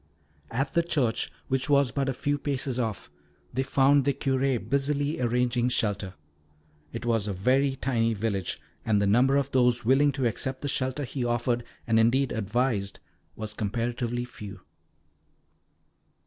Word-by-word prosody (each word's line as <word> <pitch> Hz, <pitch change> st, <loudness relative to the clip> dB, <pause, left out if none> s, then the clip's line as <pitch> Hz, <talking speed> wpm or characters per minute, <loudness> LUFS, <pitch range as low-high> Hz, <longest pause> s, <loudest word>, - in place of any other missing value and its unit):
At 135 Hz, +4 st, -2 dB
the 170 Hz, -, +4 dB
church, 145 Hz, -9 st, 0 dB, 0.2 s
which 135 Hz, +2 st, -1 dB
was 140 Hz, -3 st, +4 dB
but 135 Hz, +1 st, -1 dB
a -, -, 0 dB
few 145 Hz, +2 st, -1 dB
paces 135 Hz, -3 st, -2 dB
off, 110 Hz, -11 st, -3 dB, 0.4 s
they 130 Hz, -, 0 dB
found 135 Hz, +1 st, +4 dB
the 140 Hz, -1 st, +1 dB
Curé 135 Hz, -1 st, +1 dB
busy 140 Hz, +2 st, 0 dB
arranging 125 Hz, 0 st, +1 dB
shelter. 100 Hz, -6 st, 0 dB, 0.8 s
It 115 Hz, -, -6 dB
was 115 Hz, -3 st, +1 dB
a 100 Hz, -, -1 dB
very 130 Hz, +8 st, +2 dB
tiny 115 Hz, -4 st, 0 dB
village, 100 Hz, -3 st, -2 dB, 0.2 s
and 105 Hz, -2 st, +2 dB
the 100 Hz, -, +2 dB
number 125 Hz, +7 st, +4 dB
of 140 Hz, 0 st, -1 dB
those 125 Hz, -3 st, +2 dB
willing 140 Hz, +4 st, +4 dB
to 135 Hz, -1 st, -1 dB
accept 130 Hz, +4 st, -2 dB
the -, -, -1 dB
shelter 130 Hz, +1 st, 0 dB
he 130 Hz, 0 st, -3 dB
offered 120 Hz, 0 st, 0 dB, 0.2 s
and, 115 Hz, -1 st, +3 dB
indeed, 125 Hz, +4 st, +3 dB
advised 110 Hz, -1 st, -1 dB, 0.4 s
was 110 Hz, -1 st, -4 dB
comparatively 120 Hz, +3 st, -2 dB
few. 105 Hz, -5 st, -10 dB
125 Hz, 150 wpm, -27 LUFS, 115-135 Hz, 0.8 s, the